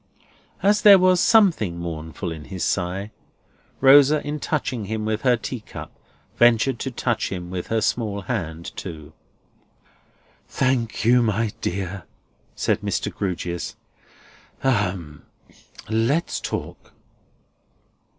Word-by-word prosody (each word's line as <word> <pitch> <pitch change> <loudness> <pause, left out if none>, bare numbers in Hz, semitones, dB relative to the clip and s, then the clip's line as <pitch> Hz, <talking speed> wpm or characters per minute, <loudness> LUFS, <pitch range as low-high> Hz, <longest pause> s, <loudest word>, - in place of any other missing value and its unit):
As 205 +1 +4
there 200 -2 +9
was 185 -1 +4
something 175 - +3
mournful 85 +1 -5
in 80 -2 -8
his 95 0 -5
sigh, 95 +3 -2 0.7
Rosa, 145 +2 +6
in 150 +1 -3
touching 130 -8 -2
him 110 +1 -3
with 110 0 -1
her 125 -2 +3
tea 125 +2 -5
cup, 105 - -10 0.5
ventured 120 +1 +4
to 135 - -3
touch 120 -2 -1
him 90 -2 -5
with 90 -1 -4
her 110 0 0
small 105 -2 -1
hand 85 -6 -4
too. 75 -5 -8 1.3
"Thank 120 -4 -1
you, 125 +1 +5
my 110 -1 0
dear," 95 0 -3 0.5
said - - 0
Mr. - - -2
Grewgious. 90 -3 -4 0.9
"Ahem! 95 - -1 0.6
Let's 115 +10 0
talk!" - - -6
110 Hz, 115 wpm, -23 LUFS, 90-130 Hz, 1.3 s, there